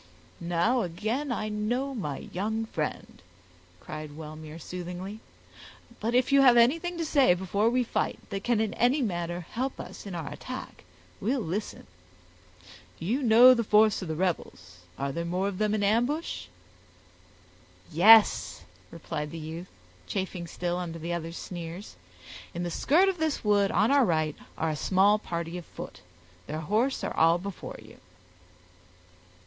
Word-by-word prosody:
"Now 175 Hz, +9 st, +1 dB
again 220 Hz, -, -2 dB
I 215 Hz, -3 st, -2 dB
know 240 Hz, +6 st, -1 dB
my 150 Hz, -, -5 dB
young 220 Hz, +4 st, -1 dB
friend," 155 Hz, -, -5 dB, 0.6 s
cried 155 Hz, +2 st, -8 dB
Wellmere, 155 Hz, 0 st, -9 dB
soothingly; 180 Hz, +4 st, -7 dB, 0.8 s
"but 230 Hz, +3 st, -1 dB
if 250 Hz, +1 st, +3 dB
you 275 Hz, 0 st, +6 dB
have 250 Hz, -3 st, +7 dB
anything 330 Hz, +9 st, +3 dB
to 330 Hz, -, -2 dB
say 275 Hz, -, +4 dB
before 200 Hz, +4 st, +1 dB
we 250 Hz, +1 st, +2 dB
fight, 235 Hz, -, -1 dB
that 195 Hz, 0 st, -3 dB
can 240 Hz, -3 st, +2 dB
in 220 Hz, -1 st, 0 dB
any 260 Hz, +4 st, +2 dB
manner 175 Hz, -4 st, -2 dB
help 260 Hz, +3 st, -3 dB
us -, -, -8 dB
in 190 Hz, -, -6 dB
our 160 Hz, -5 st, -5 dB
attack, -, -, -8 dB, 0.3 s
we'll 255 Hz, +7 st, 0 dB
listen. 205 Hz, +1 st, -4 dB, 1.1 s
You 225 Hz, -, -1 dB
know 245 Hz, +1 st, +8 dB
the 235 Hz, -2 st, 0 dB
force 215 Hz, 0 st, +4 dB
of 185 Hz, -, -5 dB
the 160 Hz, -, -3 dB
rebels; 160 Hz, -, -3 dB, 0.2 s
are 140 Hz, 0 st, -2 dB
there 170 Hz, +4 st, -3 dB
more 180 Hz, +3 st, -1 dB
of 200 Hz, -2 st, -4 dB
them 215 Hz, 0 st, +1 dB
in 205 Hz, -, -1 dB
ambush?" 245 Hz, +10 st, 0 dB, 1.4 s
"Yes," 215 Hz, +6 st, +6 dB, 0.3 s
replied 150 Hz, -2 st, -5 dB
the 165 Hz, -, -7 dB
youth, 165 Hz, +3 st, -7 dB, 0.4 s
chafing 185 Hz, -3 st, -3 dB
still 175 Hz, +1 st, -3 dB
under 170 Hz, -2 st, -5 dB
the 170 Hz, +2 st, -4 dB
other's 165 Hz, 0 st, -4 dB
sneers, 175 Hz, -, -7 dB, 0.6 s
"in 175 Hz, -, -2 dB
the 175 Hz, -, -3 dB
skirt 330 Hz, -, +3 dB
of 380 Hz, -3 st, 0 dB
this 315 Hz, -2 st, -1 dB
wood 205 Hz, -2 st, +3 dB
on 220 Hz, -, +2 dB
our 280 Hz, -1 st, +5 dB
right 155 Hz, -7 st, +1 dB, 0.2 s
are 160 Hz, 0 st, 0 dB
a -, -, -2 dB
small 195 Hz, +7 st, +3 dB
party 170 Hz, -2 st, -4 dB
of 175 Hz, -, -12 dB
foot; -, -, -9 dB, 0.5 s
their 155 Hz, +2 st, -4 dB
horse 225 Hz, -, 0 dB
are -, -, -3 dB
all 165 Hz, +1 st, +5 dB
before 195 Hz, +1 st, -7 dB
you." -, -, -15 dB
195 Hz, 155 wpm, -28 LUFS, 170-235 Hz, 1.4 s, know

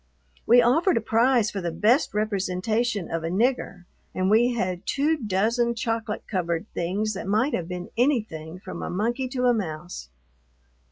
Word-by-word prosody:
We 245 Hz, +1 st, +7 dB
offered 320 Hz, +9 st, +3 dB
a -, -, +4 dB
prize 230 Hz, +1 st, +2 dB
for 195 Hz, -, -4 dB
the 175 Hz, -, -2 dB
best 215 Hz, -, +2 dB
representation 210 Hz, 0 st, -1 dB
of 165 Hz, -1 st, -2 dB
a 165 Hz, -, -2 dB
"nigger," 200 Hz, -2 st, 0 dB, 0.3 s
and 185 Hz, +1 st, +1 dB
we 240 Hz, +3 st, +4 dB
had 185 Hz, -4 st, -3 dB
two 295 Hz, +3 st, +1 dB
dozen 230 Hz, 0 st, 0 dB
chocolate 225 Hz, -2 st, -3 dB
covered 170 Hz, -2 st, -2 dB
things 200 Hz, +5 st, -1 dB
that 190 Hz, -1 st, -6 dB
might 220 Hz, +8 st, +1 dB
have 170 Hz, -, -2 dB
been 180 Hz, -1 st, -6 dB
anything 210 Hz, -, -1 dB
from 185 Hz, 0 st, -8 dB
a -, -, -4 dB
monkey 235 Hz, +7 st, -1 dB
to 250 Hz, -1 st, -1 dB
a 245 Hz, -, +5 dB
mouse. 170 Hz, -, -5 dB
215 Hz, 165 wpm, -25 LUFS, 180-240 Hz, 0.3 s, We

